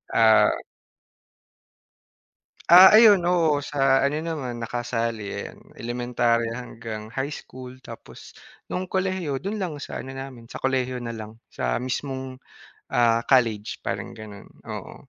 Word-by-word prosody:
ah. 110 -1 +6 2.2
Ah, 185 +3 +10
ayun, 215 -3 +8
oo, 165 -4 +3
sa 135 -1 +2
ano 150 +2 -2
naman 130 -8 -4
nakasali, 115 -2 -3
'yan, - - -7 0.2
elementarya 120 -1 -1
hanggang 110 -2 -8
high 135 +4 -3
school, 130 0 -10
tapos - - -12 0.3
no'ng 185 +1 -3
kolehiyo 185 -7 -2
do'n 205 +3 -3
lang 180 -6 -3
sa - - -6
ano 135 0 -8
namin 135 -3 -9
sa - - -10
kolehiyo 130 -1 -1
nalang 110 -2 -7 0.2
sa - - -2
mismong, 130 0 -4 0.5
ah, 115 -1 +3
college 115 -6 +1
parang - - -4
gano'n. 105 -2 -11 0.2
Oo, - - -8
130 Hz, 125 wpm, -24 LUFS, 115-145 Hz, 2.2 s, Ah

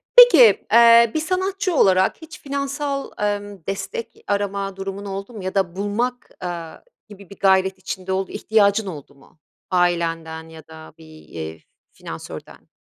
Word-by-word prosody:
Peki, 330 - +8
eee, 235 0 +7
bir - - 0
sanatçı 375 +2 -1
olarak 190 -7 +3
hiç 320 - -12
finansal, 280 0 -3
emm, 205 -1 -2
destek 450 - -6
arama 200 -1 -2
durumun 195 +1 -6
oldu 195 +3 -6
mu 210 -4 -8
ya 185 +1 -4
da 185 -3 0
bulmak, 230 +6 -2
aaa, 170 -2 -6 0.3
gibi 200 -2 -14
bir 200 - -13
gayret 190 0 +3
içinde 190 0 -6
ol 190 0 -1
ihtiyacın 210 -1 +2
oldu 145 -5 -9
mu 140 +3 -23 0.3
ailenden 165 -2 -1
ya 160 -1 -13
da 160 -1 -13
bir, 160 - -15 0.2
eee, 80 -1 -7 0.3
finansörden? - - -10
200 Hz, 145 wpm, -21 LUFS, 180-235 Hz, 0.3 s, Peki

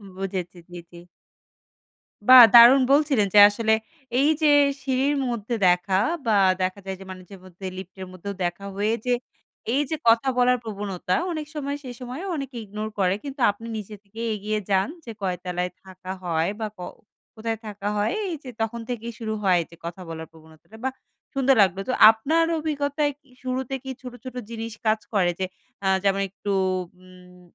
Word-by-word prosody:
বুঝেছি। 185 -2 -4
জি, 175 - -8
জি। 175 - -13 1.3
বাহ! 255 -1 +11
দারুণ 240 +3 +9
বলছিলেন 280 -8 +3
যে - - +9
আসলে 220 +1 +1 0.5
এইযে 305 +2 +3 0.3
সিঁড়ির 270 +2 +1
মধ্যে 235 0 -3
দেখা 180 +2 +2 0.3
বা 225 - +2 0.3
দেখা 185 +2 -1
যায় 190 0 -4
যে - - -9
মাঝেমধ্যে 185 0 -10
লিফটের 190 0 -8
মধ্যেও 185 +2 -6
দেখা 175 +3 -3
হয়ে 210 +3 0
যে, 250 - +2 0.6
এইযে 290 +3 0
কথা 230 +3 +5
বলার 250 0 +4
প্রবণতা 200 -4 -3 0.2
অনেক 310 -2 -4
সময় 285 -1 -3
সেসময়েও 255 +8 -7
অনেকে 275 -3 -6
ignore 215 +2 -5
করে। 185 0 +2
কিন্তু 275 -2 -7
আপনি 225 +3 -11
নিজে 210 0 -7
থেকেই 225 +3 -6
এগিয়ে 210 +1 -2
যান। 190 -1 +2 0.2
"যে 230 - -6
কয় 185 -2 -1
তলায় 180 0 -2
থাকা 185 0 -9
হয়? 165 -1 0
বা 220 - -2
ক - - -23 0.6
কোথায় 225 0 -3
থাকা 205 -1 -6
হয়?" 205 - +1 0.2
এইযে 295 -5 -7
তখন 225 +1 -2
থেকেই 235 -1 -4
শুরু 220 -1 -3
হয় 180 -3 +4
যে 170 - -14
কথা 170 +2 -6
বলার 160 0 -7
প্রবণতাটা, 160 +6 -17
বাহ! 265 - -1 0.4
সুন্দর 270 0 +3
লাগলো। 190 -1 +2
তো - - +1 0.2
আপনার 310 +9 +1
অভিজ্ঞতায় 290 -1 -1
কি 285 - -32 0.2
শুরুতে 260 +1 -3
কি 265 - -7
ছোট, 250 -1 -8
ছোট, 255 -1 -8
জিনিস 230 -1 -6
কাজ 215 0 +3
করে? 180 -3 +3
যে, 190 - 0 0.4
আ - - +2 0.2
যেমন 195 0 +2
একটু 200 +2 -8 0.5
উম 180 0 -17
215 Hz, 165 wpm, -24 LUFS, 185-255 Hz, 1.3 s, বাহ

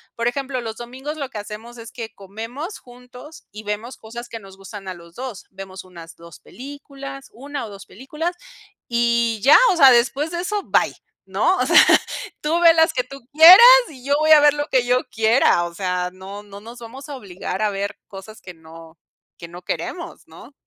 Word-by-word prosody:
por 230 0 -2
ejemplo, 265 0 -3
los 225 -1 -7
domingos 260 +6 -8
lo 280 -3 -5
que 220 - -9
hacemos 215 +3 -9
es 230 0 -11
que 230 -4 -8
comemos 225 - -8
juntos 250 +5 -15
y 210 +1 -10
vemos 210 +4 -6
cosas 235 +2 -10
que 225 - -8
nos 195 -2 -15
gustan 195 0 -11
a 185 - -5
los 170 -1 -16
2. 245 -2 -8
Vemos 190 0 -10
unas 170 -3 -13
2 170 -1 -15
películas, 275 0 -11
1 280 +1 -7
o - - -12
2 200 -1 -12
películas, 300 - -6 0.5
y 235 -2 0
ya, 280 - +8
o 365 - -1
sea, 270 -5 +8
después 270 +6 +1
de 345 - -4
eso, 410 +2 -3
bye, - - 0 0.3
¿no? - - +1
O - - 0
sea, - - +6 0.6
tú 320 +3 0
ve 335 -1 +6
las 320 0 +3
que 250 - -1
tú 275 +2 -12
quieras, 330 +5 +10 0.3
y 260 -5 -14
yo 280 - +1
voy 310 0 +1
a 310 - +9
ver 295 -1 +5
lo 290 0 -4
que 255 -5 +1
yo 250 +1 +1
quiera. 220 -6 +2
O 170 - -8
sea, 180 0 -3
no 195 +2 -10
no 200 0 -13
nos 230 +3 -12
vamos 255 +5 -11
a 285 - -6
obligar 190 -3 -7
a 210 - 0
ver 200 0 -5
cosas 200 +3 -12
que 180 - -10
no 165 0 -15 0.4
que 170 - -9
no 175 +2 -12
queremos, 340 - -6
¿no? - - -15
235 Hz, 205 wpm, -20 LUFS, 195-275 Hz, 0.6 s, quieras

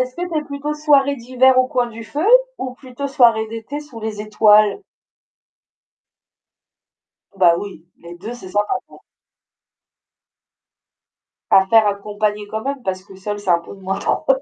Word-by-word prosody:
est-ce 255 0 -2
que 350 - -4
tu 315 - +1
es 300 - -4
plutôt 285 +1 -4
soirée 280 -2 +3
d'hiver 255 +2 +3
au 255 - +4
coin 250 -1 0
du 230 0 -10
feu? 300 - -3 0.3
Ou 255 -1 -5
plutôt 260 +1 -7
soirée 235 -5 +3
d'été 230 +6 -6
sous 275 -6 -12
les 215 -1 -5
étoiles? 215 - +4 2.6
Bah, 175 -3 +5
oui, 185 -4 -8 0.2
les 170 +1 -10
2, 210 +7 -7
c'est 215 -6 -11
sympa, 205 +2 0
quoi. - - -17 2.5
À 190 - +6
faire 220 +2 +4
accompagné 205 +1 -2
quand 220 +1 -4
même, 280 +2 -3
parce 185 -1 -3
que 195 0 -15
seul, 205 +2 -5
c'est 205 - -6
un 175 - +5
peu 170 - -12
de - - -17
moins 190 +1 -3
drôle - - -1
je - - +6
pense - - -5
225 Hz, 170 wpm, -19 LUFS, 205-265 Hz, 2.6 s, À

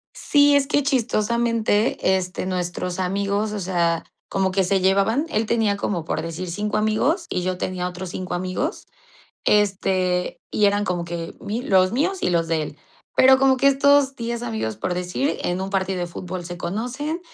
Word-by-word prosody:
Sí, 285 -1 +4
es 275 -1 +3
que 290 -1 +2
chistosamente, 230 -5 +1
este, 185 0 -4
nuestros 180 0 -3
amigos, 200 +3 -1
o 210 - -3
sea, 170 -3 0 0.2
como 190 -1 0
que 190 0 +2
se 190 0 +1
llevaban 200 +9 +2
él 215 +1 0
tenía 220 -3 +1
como 175 -6 -2
por - - -2
decir 165 +2 -5
5 210 +4 -2
amigos 225 - +1
y 180 - -1
yo 185 0 -1
tenía 180 -1 -2
otros 180 0 -6
5 185 0 -5
amigos, 185 - -3 0.6
este, 190 -3 +1
y 210 - +1
eran 205 0 +3
como 175 -1 -2
que 170 -1 -5
mi 225 +4 -3
los 185 -4 +3
míos 360 +9 0
y - - +2
los 165 -1 +1
de 160 -2 +1
él, 150 - -7 0.4
pero 265 0 +6
como 270 -1 +4
que 275 +2 +4
estos 275 0 +4
10 235 0 -4
amigos, 220 - -3
por 180 - -2
decir, 180 +11 -1
en 180 +1 -1
un 190 +1 -3
partido 190 -1 -1
de 175 - -1
fútbol 180 +1 -6
se 175 0 -7
conocen, 250 - -3
195 Hz, 185 wpm, -22 LUFS, 180-235 Hz, 0.6 s, pero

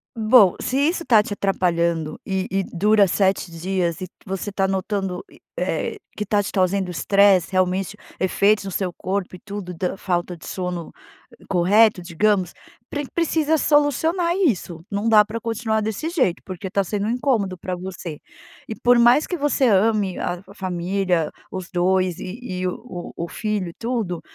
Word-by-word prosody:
Bom, 215 -4 +5
se 255 - -2
isso 335 +4 +1
tá 220 -3 +5
te 205 - -5
atrapalhando, 170 -5 0
e 190 -1 -1
e 195 0 +1
dura 205 +2 +3
7 190 -1 +1
dias, 170 0 -2
e 185 - -4 0.2
você 195 +1 -4
tá 195 -1 +1
notando, 190 -1 -2
e - - -18 0.2
eh, - - -2 0.2
que 210 - -2
tá 205 0 +1
te - - -5
trazendo 185 -1 +1
estresse, 195 +3 +4
realmente, 185 +2 0 0.2
efeitos 200 +2 +2
no 195 - -4
seu 185 -1 -1
corpo 185 0 -3
e - - -21
tudo, 200 -3 -7
da 180 +3 -2
falta 175 -2 -2
de 160 - -13
sono 180 -2 -4 0.6
correto, 195 +2 +4
digamos, 185 +1 +1 0.4
pre 290 -1 -3
precisa 320 -2 +1
solucionar 320 +5 +2
isso, 185 - 0
não 205 +3 -1
dá 215 -2 +7
pra 220 +2 -5
continuar 225 -1 -1
desse 220 +10 -3
jeito, 260 - +1
porque 185 +1 -6
tá 200 +1 +1
sendo 205 +2 -2
um - - 0
incômodo 230 -8 0
pra 185 +1 -4
você. 175 -4 -7 0.5
E 220 - -5
por 245 +1 +4
mais 240 +5 +5
que 355 - -3
você 285 -2 0
ame 205 -2 +2
a 175 - -1
f - - -17
família, 180 -2 -1 0.2
os 185 -2 -6
2, 185 0 +1
e 185 +5 -6
e 185 -5 -3
o 180 -1 -7
o 170 - -4
filho 210 -5 -2
e 170 - -11
tudo, 225 -8 -2
195 Hz, 175 wpm, -22 LUFS, 180-220 Hz, 0.6 s, dá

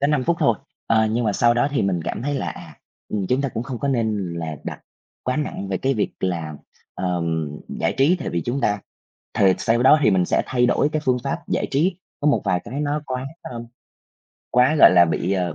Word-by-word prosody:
Có 140 - +3
5 145 -4 +1
phút 170 - +1
thôi, 145 - +3 0.3
ờ, 110 -1 +3
nhưng 115 +2 0
mà 105 - +1
sau 120 +2 +3
đó 140 +4 +2
thì 140 - 0
mình 95 -3 0
cảm 115 - -4
thấy 145 +1 -1
là, - - -2
à, - - -11 0.3
ừm, 100 -3 -2
chúng 130 +2 +2
ta 140 - 0
cũng 115 0 -4
không 125 -2 -6
có 140 - -2
nên 110 -8 -1
là 80 -2 -4
đặt - - -6 0.4
quá 130 +3 -1
nặng 125 -10 -3
về 95 - -1
cái 135 0 0
việc 105 - -1
là, 85 -4 -2 0.4
ờm, 85 -4 -1 0.3
giải 80 - +1
trí 155 +7 +4
tại - - -5
vì 85 -1 -2
chúng 130 +3 -2
ta 105 -1 +1 0.5
thề 95 -2 +4
sau 120 +1 +1
đó 150 +3 +7
thì 110 - +5
mình 90 -2 +3
sẽ - - +1
thay 125 -1 +2
đổi 140 +4 +2
cái 155 - -1
phương 125 -1 +3
pháp 135 - -2
giải - - -1
trí, 170 +6 +1 0.2
có 150 - 0
một 145 - +3
vài 90 - +1
cái 140 +4 -5
nó 150 +1 -1
quá, 130 0 -4 0.2
ơm, 120 -1 -7 0.9
quá, 125 +5 +4
gọi - - +9
là, 85 -1 +7
bị, 85 +3 -1
ờ 90 -4 -1
120 Hz, 240 wpm, -22 LUFS, 95-135 Hz, 0.9 s, gọi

